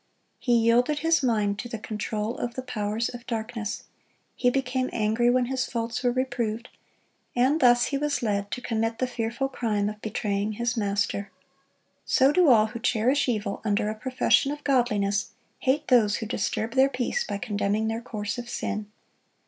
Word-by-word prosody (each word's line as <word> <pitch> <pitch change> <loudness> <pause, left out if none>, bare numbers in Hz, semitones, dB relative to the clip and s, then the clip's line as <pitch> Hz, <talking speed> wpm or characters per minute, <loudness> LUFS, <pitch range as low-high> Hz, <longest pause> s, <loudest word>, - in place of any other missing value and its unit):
He 245 - +1
yielded 240 +6 +3
his 325 -1 +3
mind 210 -5 +1
to 240 - -5
the 230 - -4
control 215 +1 -3
of 240 0 -3
the 260 - -4
powers 215 -2 -2
of 245 -1 -10
darkness, 225 -2 -4 0.5
he 245 - +3
became 255 0 -1
angry 225 +2 +2
when 250 0 +3
his 260 +1 -1
faults 230 0 -3
were 245 -1 +2
reproved, 240 -2 -2 0.7
and 260 +6 +3
thus 245 -2 +5
he 275 - +1
was 285 -4 -1
led 200 -2 0
to 250 - -4
commit 225 0 -1
the 255 - +1
fearful 245 +2 -2
crime 215 -6 -1
of 210 0 -9
betraying 210 -1 -2
his 235 +3 -1
Master. 200 -2 -1 0.7
So 270 +1 +4
do 355 -1 +4
all 220 -4 +6
who 235 +2 -6
cherish 250 +4 +2
evil 210 -4 -2
under 210 0 +1
a - - -3
profession 260 +4 +2
of 295 0 -6
godliness 210 -7 +1 0.3
hate 290 +3 +1
those 220 -5 +4
who 225 - -3
disturb 220 0 -2
their 270 +1 +5
peace 255 - -1
by 205 - -4
condemning 205 +1 -1
their 225 +1 -2
course 210 -1 -4
of 240 0 -7
sin. 210 -2 -3
235 Hz, 175 wpm, -26 LUFS, 215-255 Hz, 0.7 s, all